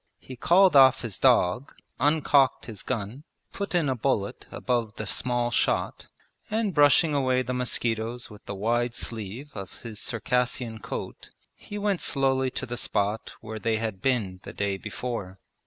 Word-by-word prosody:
He 130 - -10
called 180 +6 +5
off 135 -1 +7
his 100 -5 -4
dog, 125 -2 +3 0.2
uncocked 145 -2 +3
his 110 -4 -8
gun, 115 +3 -4 0.3
put 200 -2 -3
in 165 -4 +2
a 130 - +2
bullet 110 -5 -1
above 115 -4 -1
the 105 - -5
small 120 +2 -1
shot, - - 0 0.4
and 215 -2 0
brushing 145 +1 +5
away 130 -2 +2
the 125 - -3
mosquitoes 120 -1 -1
with 105 -1 -14
the 100 - -4
wide 120 +4 0
sleeve 115 +4 -5
of 95 -3 -9
his 110 -3 -6
Circassian 120 0 -1
coat - - -7 0.2
he 205 - -9
went 200 -3 0
slowly 135 -2 +1
to 130 - -5
the 120 -1 -5
spot 105 0 -1
where 110 0 -6
they 110 +1 +1
had 110 -4 -4
been 105 -8 0
the - - -9
day 100 -1 -1
before. 105 -1 -5
120 Hz, 160 wpm, -27 LUFS, 110-135 Hz, 0.4 s, off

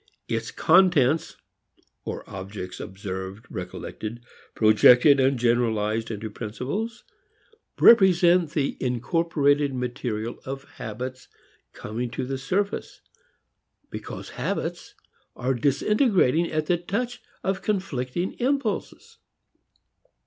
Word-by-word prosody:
Its - - -2
contents 160 -4 +3 0.7
or - - -6
objects, 95 -1 -7
observed, 95 +1 -6
recollected, 110 +2 -6 0.4
projected 120 +6 +6
and 135 0 +3
generalized 115 -2 +1
into 110 0 -4
principles, 130 - -5 0.8
represent 180 -6 +6
the 145 -3 -1
incorporated 145 +2 +1
material 120 -2 -3
of 135 +1 -6
habits 125 +3 -7 0.4
coming 120 +3 -5
to 125 - -4
the 135 +1 -4
surface, 195 +9 -2 0.9
because - - -7
habits - - -4 0.4
are 130 +1 0
disintegrating 170 - +2
at 155 0 0
the 175 +2 +2
touch 235 +8 -3 0.2
of 190 0 -1
conflicting 175 -5 -2
impulses. 275 +3 -2
135 Hz, 90 wpm, -25 LUFS, 115-175 Hz, 0.9 s, projected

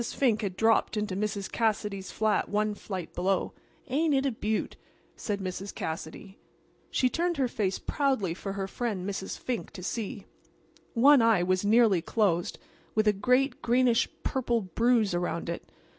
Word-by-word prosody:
Fink 235 -1 +1
had 190 -3 -3
dropped 225 +1 +3
into 210 -3 -2
Mrs. 200 -1 -2
Cassidy's 210 -4 -1
flat 215 -1 +1
one 210 0 +1
flight 190 -4 -6
below. 190 +2 0 0.3
"Ain't 295 +3 +2
it 270 +1 +1
a 275 - +2
beaut?" 220 -1 -2 0.4
said 205 -2 -3
Mrs. 190 +1 -5
Cassidy. 160 +5 -6 0.5
She 255 - +2
turned 345 +5 -1
her 265 -2 +2
face 200 -5 -1
proudly 265 - 0
for 195 +2 -5
her 195 -1 -3
friend 200 -3 -3
Mrs. 190 -1 -4
Fink 250 -2 -4
to 180 - -8
see. 215 +1 -4 0.7
One 270 +3 +7
eye 225 -6 +4
was 185 +1 +1
nearly 210 -4 +4
closed, 175 -3 0 0.4
with 215 0 +2
a 210 - +5
great, 250 +6 +1
greenish 245 -1 +3
purple 240 -3 0
bruise 220 +2 +2
around 175 -1 -2
it. 170 - -5
210 Hz, 160 wpm, -28 LUFS, 190-240 Hz, 0.7 s, One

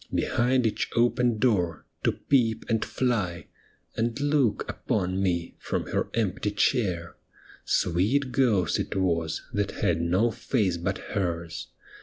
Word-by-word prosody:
Behind 125 +1 +1
each 110 -1 0
open 120 0 +3
door 95 -9 +1 0.2
to - - +3
peep 115 -5 +1
and 110 -1 +1
fly. 95 -11 -1 0.5
And 115 +3 -1
look 145 -5 +1
upon 95 -2 -1
me 85 -3 -1
from - - -3
her - - 0
empty 105 -2 0
chair; 100 -5 0 0.5
Sweet 110 +11 +1
ghost 105 - +2
it - - -3
was, 85 -4 0
that 100 -1 0
had 85 -1 +2
no 90 +8 +2
face 105 -8 0
but 85 - -2 0.2
hers. 85 -2 -2
105 Hz, 130 wpm, -27 LUFS, 85-120 Hz, 0.5 s, open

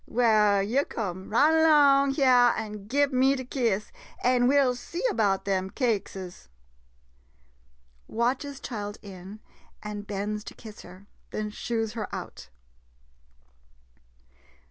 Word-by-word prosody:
Well, 215 -4 +3
yo' 250 +8 +1
come 190 -7 -5
right 305 +8 +4
'long 280 -3 +5
hyah 250 -4 +5
an' 210 -2 -6
gib 280 +3 +1
me 265 +2 +3
de 260 -1 -6
kiss, 230 -6 -1 0.3
an' 245 0 +3
we 280 +2 +4
'11 260 -3 +3
see 345 - -6
'bout 200 -4 +1
dem 190 -1 -1
cakeses. 195 - -3 1.6
[Watches 260 +4 -2
child 205 -5 -6
in, 195 +1 -10 0.4
and 210 -1 -6
bends 210 +1 -3
to - - -9
kiss 220 -3 -11
her, 185 +2 -14 0.2
then 210 0 -4
shoos 225 0 -3
her 215 -4 -4
ont. - - -9
225 Hz, 120 wpm, -27 LUFS, 205-260 Hz, 1.6 s, long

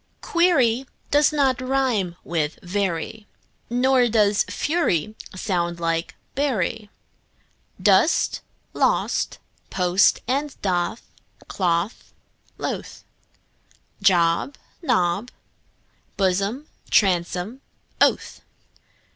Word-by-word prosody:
Query 270 -8 +2 0.2
does 290 +1 +4
not 270 -4 +1
rime 255 -9 0
with 160 0 -2
very, 190 +2 -3 0.4
Nor 250 +1 +3
does 210 -3 +3
fury 215 - 0 0.2
sound 175 -3 -2
like 165 0 -2 0.2
bury. 225 -6 -1 0.9
Dost, - - +3 0.3
lost, - - 0 0.3
post 180 0 +3
and 280 +2 -2
doth, 185 +3 -1 0.4
cloth, 175 +2 -1 0.4
loth; - - -5 1.0
Job, 180 +6 +2 0.3
Job, 210 - +1 0.9
blossom, 200 +8 0 0.2
bosom, 185 +5 +1 0.4
oath. - - +2
205 Hz, 75 wpm, -23 LUFS, 175-260 Hz, 1.0 s, does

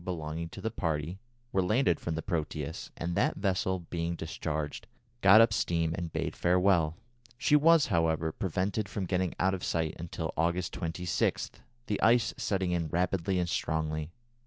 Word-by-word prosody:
belonging 80 -2 -4
to - - -10
the 110 - -2
party 80 +1 -2 0.3
were 95 - +2
landed 100 - +2
from 85 - -3
the 80 - -4
Proteus, 80 -3 -3
and 85 +1 -2
that 100 - +2
vessel, 95 -1 0
being 85 0 -1
discharged, 80 -2 -4 0.3
got 100 +3 +8
up 115 -2 +5
steam 85 -4 0
and 85 -1 -4
bade 80 0 -2
farewell. 90 -3 +3 0.4
She 150 - +3
was, 160 0 +6
however, 80 -1 +1
prevented 95 +4 -2
from 100 - -3
getting 90 0 -1
out 95 +1 +2
of 95 - -4
sight 80 -2 -1
until 80 -1 -4
August 85 +2 0
26, 85 -3 -1 0.3
the 105 - -2
ice 120 +1 +4
setting 95 -3 -1
in 85 -2 0
rapidly 90 +3 0
and 90 -1 0
strongly. 80 -2 -1
85 Hz, 160 wpm, -30 LUFS, 80-95 Hz, 0.4 s, got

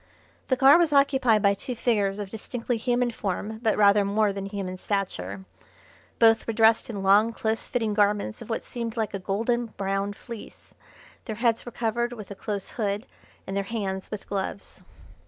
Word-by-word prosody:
The 260 - +2
car 275 +5 +7
was 335 -3 +3
occupied 265 -6 +4
by 200 0 +5
two 245 +5 -5
figures 205 -4 +1
of 205 -2 -6
distinctly 235 +2 -3
human 245 +1 +1
form 215 +1 -4
but 225 -3 +1
rather 205 0 +5
more 205 +1 +1
than 195 0 -5
human 195 -2 -5
stature. 195 -1 -3 0.7
Both 225 -1 +4
were 230 - -1
dressed 225 +1 +4
in 200 -4 -4
long, 205 +4 +5
close 220 0 -2
fitting 225 -4 -1
garments 205 - +1
of - - -10
what 225 - -3
seemed 235 -1 -5
like 220 -2 -1
a 195 - -3
golden 230 +5 -1
brown 195 -1 -2
fleece. 230 +1 -11 0.5
Their 220 - -4
heads 230 +1 0
were - - -5
covered 240 +1 -1
with 210 -4 -9
a - - -6
close 200 0 -4
hood 210 0 -2 0.4
and 195 - -5
their 200 - 0
hands 195 -3 -3
with 210 - -7
gloves. 200 0 -5
215 Hz, 180 wpm, -26 LUFS, 200-235 Hz, 0.7 s, car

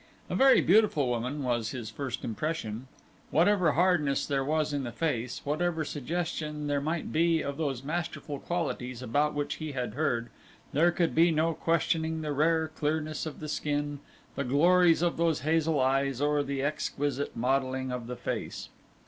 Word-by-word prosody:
A - - 0
very 270 0 +6
beautiful 185 - +4
woman 125 +4 -2
was 120 -3 0
his 120 -4 -6
first 130 0 -4
impression. 120 -2 -3 0.4
Whatever 175 -1 +3
hardness 165 -5 +2
there 140 -2 0
was 155 +1 0
in 140 -1 -1
the 120 - -4
face, 125 -5 -2
whatever 160 +2 -1
suggestion 150 0 -3
there 145 -1 0
might 160 +3 -2
be 165 0 +3
of 140 0 -4
those 140 -5 -2
masterful 155 -2 -4
qualities 130 -8 -3
about 145 +6 +1
which 145 0 -2
he 155 -2 -5
had 125 -2 -3
heard, 120 -5 -1 0.4
there 165 +5 +4
could 175 -1 0
be 165 +2 +5
no 165 +1 +2
questioning 160 0 0
the 150 - -2
rare 160 +2 +2
clearness 155 0 -2
of 155 - -7
the 155 - -6
skin, 145 -1 -2 0.3
the 140 - -2
glories 165 +5 +4
of 175 - +1
those 165 -2 +1
hazel 160 0 +1
eyes, 135 0 +1
or 145 0 +2
the 140 -1 -2
exquisite 145 -2 -2
modelling 130 +1 0
of 125 -2 -4
the 125 - -4
face. - - -4
150 Hz, 165 wpm, -29 LUFS, 135-160 Hz, 0.4 s, very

